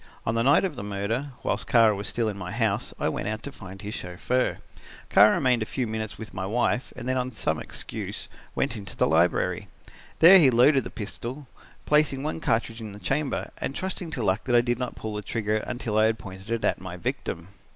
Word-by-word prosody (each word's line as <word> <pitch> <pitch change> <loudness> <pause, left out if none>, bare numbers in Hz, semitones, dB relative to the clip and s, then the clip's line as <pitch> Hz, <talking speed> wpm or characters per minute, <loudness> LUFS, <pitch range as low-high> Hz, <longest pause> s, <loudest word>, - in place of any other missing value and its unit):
On 110 - +1
the 115 - +1
night 140 +9 +5
of 175 -6 -3
the 120 - -6
murder, 105 +7 -2 0.2
whilst 100 - -1
Kara 115 -3 +5
was 100 0 -4
still 115 +1 0
in 105 - -2
my 90 -2 -6
house, 110 -1 0
I - - +1
went - - -2
out 110 0 -3
to 140 - -5
find 95 -6 -10
his 105 +1 -6
chauffeur. 100 +9 -1 0.5
Kara 105 +1 +7
remained 125 -3 +2
a - - 0
few 130 - -2
minutes 110 -1 -4
with 110 - -9
my 95 - -4
wife 120 +3 0
and 125 -1 -7
then 130 0 +1
on 125 0 -1
some 85 -8 -1
excuse - - -5 0.3
went - - 0
into 100 -4 -8
the - - +3
library. 80 +3 +2 0.5
There 185 +4 +9
he 145 -6 +7
loaded 130 +3 +5
the - - -5
pistol, 120 +5 -6 0.4
placing 150 -3 +2
one 155 +2 -2
cartridge 115 -4 -1
in 105 -2 -7
the 100 - -10
chamber, 140 +5 -1
and 135 - -3
trusting 185 -2 -3
to 125 - -2
luck 95 +2 +1
that 120 - +2
I 120 - +7
did 120 0 -1
not 125 -1 -3
pull 110 -1 -5
the 105 - -3
trigger 110 0 -1
until 110 -1 -2
I 110 - +5
had 110 0 +2
it - - -23
pointed 100 +4 -5
at - - +1
my 90 -1 -7
victim. 85 0 -4
115 Hz, 225 wpm, -26 LUFS, 100-130 Hz, 0.5 s, There